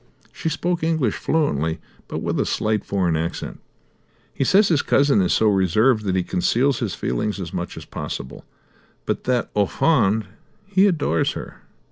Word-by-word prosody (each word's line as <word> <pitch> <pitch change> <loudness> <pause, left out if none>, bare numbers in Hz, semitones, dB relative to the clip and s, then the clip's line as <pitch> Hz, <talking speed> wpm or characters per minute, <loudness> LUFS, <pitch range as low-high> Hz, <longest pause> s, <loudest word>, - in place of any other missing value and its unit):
She 160 - -3
spoke 175 +2 -1
English 160 -9 +1
fluently, 80 - 0 0.3
but - - -5
with - - -1
a - - +1
slight 110 -1 0
foreign 90 -4 0
accent. 85 +2 -4 0.7
"He - - -1
says 195 - +4
his 155 -4 +3
cousin 140 -6 +3
is 90 - +1
so 110 - +3
reserved 105 +4 +3
that 95 -2 0
he 95 - +1
conceals 125 +10 +1
his 110 -8 -2
feelings 100 - -2
as 90 -4 -6
much - - -4
as - - -8
possible, 65 - -6 0.6
but - - -2
that, 125 -2 0
au 100 -1 +3
fond, 110 - +2 0.4
he 200 0 +3
adores 150 - +1
her." - - -9
110 Hz, 165 wpm, -22 LUFS, 95-150 Hz, 0.7 s, says